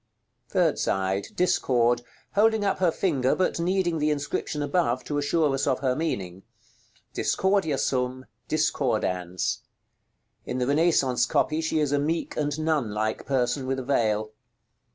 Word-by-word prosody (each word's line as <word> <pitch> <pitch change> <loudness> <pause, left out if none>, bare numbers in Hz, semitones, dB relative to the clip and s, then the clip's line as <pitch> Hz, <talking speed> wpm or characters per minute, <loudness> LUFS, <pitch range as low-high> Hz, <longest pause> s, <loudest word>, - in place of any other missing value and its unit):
§ - - -52
LXXI. - - -37
Third - - +2
side. 95 +1 0
Discord; 120 -9 +2 0.3
holding 220 0 +3
up 195 - 0
her 185 -2 +4
finger, 140 -9 +1
but 185 -2 0
needing 175 -1 0
the 150 +1 +1
inscription 150 0 -2
above 145 -6 0
to 145 -1 -2
assure 145 0 +1
us 135 - -1
of 130 -2 +1
her 130 -2 +1
meaning, 95 - -3 0.7
"DISCORDIA 190 -7 +1
SUM, 130 0 -1 0.2
DISCORDANS." 105 - 0 0.8
In 125 - -4
the 125 - 0
Renaissance 140 -5 +2
copy 155 +1 +1
she 160 0 -1
is 150 -2 +1
a 145 - +2
meek 160 +4 -2
and 145 -1 -1
nun 155 -7 0
like 110 +1 -2
person 130 0 0
with 135 0 -1
a 130 - -4
veil. 110 -5 0
140 Hz, 155 wpm, -26 LUFS, 120-160 Hz, 0.8 s, her